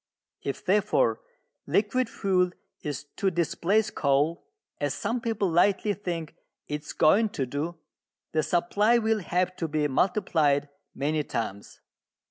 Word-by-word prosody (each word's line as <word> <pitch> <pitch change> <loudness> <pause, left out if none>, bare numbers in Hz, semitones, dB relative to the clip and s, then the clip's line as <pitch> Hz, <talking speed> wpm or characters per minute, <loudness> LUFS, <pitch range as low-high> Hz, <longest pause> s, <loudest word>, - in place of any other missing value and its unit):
If, 140 - -5
therefore, 210 - +2 0.5
liquid 225 +4 +1
fuel 180 -4 +1 0.3
is 145 -3 -4
to 195 - +2
displace 185 +5 +1
coal, 145 +4 +1 0.3
as 145 -1 -1
some 230 +4 -2
people 220 -4 0
lightly 195 +4 +3
think 170 -6 -4 0.3
it 150 0 -3
is 150 - -8
going 210 +8 +4
to 140 -9 -2
do, 150 +7 -4 0.5
the 155 - +2
supply 205 +8 +2
will 220 -1 +1
have 180 0 0
to 165 - -2
be 150 -1 0
multiplied 145 -3 +2 0.3
many 150 +3 0
times. 100 -6 -5
175 Hz, 130 wpm, -27 LUFS, 150-205 Hz, 0.5 s, going